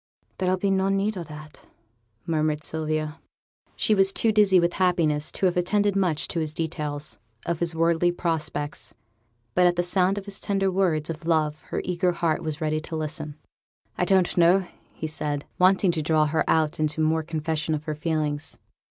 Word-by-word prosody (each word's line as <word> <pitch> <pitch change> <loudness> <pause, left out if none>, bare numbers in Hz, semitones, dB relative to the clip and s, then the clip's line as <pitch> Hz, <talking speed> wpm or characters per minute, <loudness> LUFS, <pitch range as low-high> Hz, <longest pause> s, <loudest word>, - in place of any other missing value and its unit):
'There'll 185 0 +1
be 195 +1 0
no 190 0 +2
need 195 +2 0
o' 180 - -4
that,' 150 -1 -12 0.6
murmured 155 -2 0
Sylvia. 155 0 -3 0.6
She 215 - +2
was 195 -1 +5
too 225 +3 +2
dizzy 205 -3 +5
with 170 0 +1
happiness 160 -5 +2
to - - -1
have 180 - +2
attended 200 +3 +1
much 180 -6 0
to 170 - -1
his 155 -1 -3
details 150 -7 -4 0.3
of 170 -2 -2
his 170 -1 0
worldly 165 +1 +2
prospects, 155 -4 -3 0.6
but 180 +5 +5
at 175 - +2
the 175 - +1
sound 185 +2 +2
of 200 - -5
his 200 -1 -3
tender 195 -1 0
words 170 -5 +1
of 165 +1 -8
love 155 -2 +1
her - - -3
eager 180 0 +1
heart 165 -2 0
was 155 -1 -4
ready 155 -1 0
to 160 +1 -6
listen. 155 -1 -4 0.6
'I 180 - 0
don't 185 -1 +2
know,' 180 +2 +5 0.4
said 150 -2 -3
he, - - -32
wanting 185 0 +4
to 165 -2 -2
draw 155 0 +2
her 155 +2 +1
out 155 -1 +2
into 155 0 -1
more 160 +1 +2
confession 155 0 -2
of 150 - -5
her 155 -1 -3
feelings. 150 -1 -2
165 Hz, 185 wpm, -25 LUFS, 155-180 Hz, 0.6 s, was